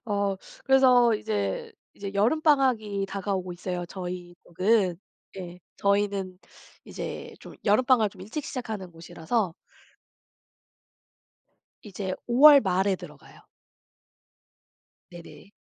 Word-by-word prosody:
어 200 -3 -1 0.3
그래서 255 -3 +5
이제 100 - -3 0.2
이제 200 -1 -7
여름방학이 235 -4 +2
다가오고 195 -2 -3
있어요 175 0 -4
저희 180 -1 -7
쪽은. 185 0 +1 0.4
예. 180 -1 -8 0.2
저희는 200 -2 0 0.5
이제 - - -7
좀 - - -12
여름방학을 225 0 +3
좀 195 - -17
일찍 220 +10 -6
시작하는 220 -7 -6
곳이라서 165 +3 -3 2.3
이제 195 -2 -5
5 240 +2 0
월 285 -2 +9
말에 190 0 +1
들어가요. - - -14 1.7
네네. 175 +3 -13
200 Hz, 220 characters per minute, -26 LUFS, 180-230 Hz, 2.3 s, 월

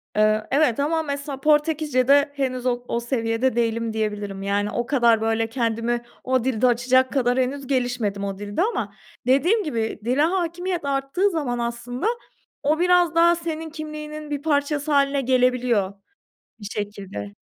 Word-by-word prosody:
Eee, 215 0 +2
evet 275 -4 +2
ama, 320 +3 +1
mesela, 280 -2 -5
Portekizce'de 295 -2 +3
henüz 255 -3 -2
o 245 -1 0
o 235 - -1
seviyede 235 0 0
değilim 230 -1 0
diyebilirim. 210 -3 -3
Yani, 205 +1 0
o 240 +3 -2
kadar 235 -5 +3
böyle 225 0 +1
kendimi 235 0 -1 0.2
o 255 -2 +1
dilde 255 -1 +2
açacak 255 +2 +3
kadar 250 -2 +1
henüz 265 +1 -2
gelişmedim 245 -6 -1
o 195 -1 -3
dilde 205 - -3
ama 445 +5 -1 0.3
dediğim 350 - +3
gibi 230 - -2
dile 255 +4 +2
hakimiyet 350 0 -1
arttığı 280 +8 +1
zaman 285 -9 -2
aslında 235 - -3 0.6
o 300 +2 +2
biraz 355 -1 +3
daha 340 +1 +5
senin 325 -1 -5
kimliğinin 305 -1 -7
bir 290 -1 -2
parçası 290 0 0
hâline 280 -1 +3
gelebiliyor, 250 -5 +2 0.7
bir 205 - -10
şekilde. 200 - -6
255 Hz, 150 wpm, -23 LUFS, 230-300 Hz, 0.7 s, daha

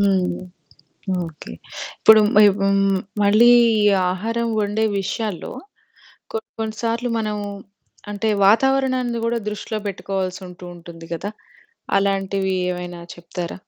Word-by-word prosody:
హ్మ్. 190 -3 +1 0.9
ఓకే. 160 -2 -10 0.5
ఇప్పుడు 220 0 +7 0.4
హ్మ్. 195 0 +3 0.3
మళ్ళీ 215 +4 +6 0.3
ఈ - - +3 0.3
ఆహారం 230 +5 -2
వండే 210 +2 0 0.2
విషయాల్లో 195 -1 -4 0.8
కొన్ని 220 0 -5
కొన్ని 220 -1 -3
సార్లు 235 +1 -1
మనం 215 -1 -2 0.7
అంటే, 210 +2 -2 0.2
వాతావరణాన్ని 255 +1 +2
గూడా 235 0 0
దృష్టిలో 210 +1 -4
పెట్టుకోవాల్సి 190 -1 -3
ఉంటూ 180 0 -12
ఉంటుంది 165 -1 -12
గదా! 200 +5 -4 0.7
అలాంటివి 195 -1 0 0.2
ఏమైనా 175 -1 -6 0.2
చెప్తారా? 175 0 -6
200 Hz, 105 wpm, -21 LUFS, 185-225 Hz, 0.9 s, ఇప్పుడు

